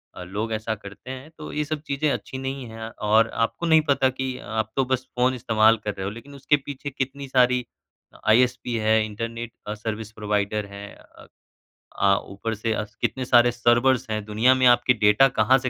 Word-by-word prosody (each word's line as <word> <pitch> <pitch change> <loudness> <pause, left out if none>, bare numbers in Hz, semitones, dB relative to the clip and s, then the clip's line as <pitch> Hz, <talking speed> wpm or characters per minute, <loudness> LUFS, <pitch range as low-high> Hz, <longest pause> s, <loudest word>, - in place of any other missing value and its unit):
अ, 90 - -7
लोग 105 +5 -4
ऐसा 110 0 -2
करते 100 +5 -10
हैं 130 +3 -8
तो 150 - -8
ये 150 - 0
सब 155 0 -4
चीज़ें 140 +2 0
अच्छी 130 - -4
नहीं 135 0 -4
हैं 110 0 -7
और 110 +1 +2
आपको 145 +8 -2
नहीं 160 -1 +5
पता 135 -1 +3
कि 130 0 -4
आप 110 +1 -3
तो 135 -1 +2
बस 130 0 -1
फ़ोन 125 +1 +2
इस्तेमाल 110 -1 +3
कर 105 - -2
रहे 95 - -5
हो - - -1
लेकिन 135 +6 -11
उसके 145 +2 +2
पीछे 145 0 -7
कितनी 135 +1 -4
सारी 125 -1 +3 0.5
अ, - - -17
आईएसपी 125 +1 +3
है, 110 0 +2
इंटरनेट 115 +2 -6
अ, 105 - -2
सर्विस 110 0 -5
प्रोवाइडर 105 0 -1
हैं। 100 0 -9
अ - - -18 0.8
अ, 100 0 +5
ऊपर 105 +3 -4
से 110 +2 -2
अ, 105 - -2 0.2
कितने 130 -1 -1
सारे 120 -1 +5
सर्वर्स 120 +1 +2
हैं, 110 -1 -2
दुनिया 110 +5 +3
में 130 0 +2
आपकी 120 +1 +5
डेटा 105 +3 +5
कहाँ 120 +5 +5
से 130 0 -2
120 Hz, 205 wpm, -24 LUFS, 110-130 Hz, 0.8 s, नहीं